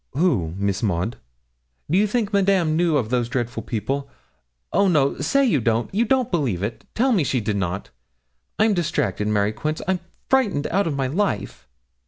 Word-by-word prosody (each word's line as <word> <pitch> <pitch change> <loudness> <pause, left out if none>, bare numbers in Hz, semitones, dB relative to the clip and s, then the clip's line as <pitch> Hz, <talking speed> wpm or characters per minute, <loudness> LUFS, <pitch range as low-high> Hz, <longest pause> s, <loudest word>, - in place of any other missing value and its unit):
'Who, 125 - +1
Miss 100 0 -1
Maud?' 100 +2 -1 0.7
'Do 160 - 0
you 205 +3 +4
think 210 -1 -1
Madame 190 -5 +3
knew 165 -2 +2
of 120 -4 -2
those 120 -2 +1
dreadful 120 -1 -2
people? 135 +5 -3 0.6
Oh, 200 - +4
no 150 -6 +2
say 275 - +2
you 175 - +2
don't 115 +5 0
you 225 +4 +2
don't 260 0 +1
believe 125 - 0
it 110 +3 -4
tell 260 +4 +2
me 195 -9 +3
she 130 -1 0
did 105 -2 -1
not. 95 0 -3 0.7
I'm 215 0 +4
distracted, 165 - -1
Mary 105 -1 +2
Quince, 155 +6 -3
I'm 190 -1 +1 0.3
frightened 215 - +2
out 195 +1 +2
of 150 - -1
my 135 -1 0
life.' 130 - -2
145 Hz, 180 wpm, -23 LUFS, -, 0.7 s, you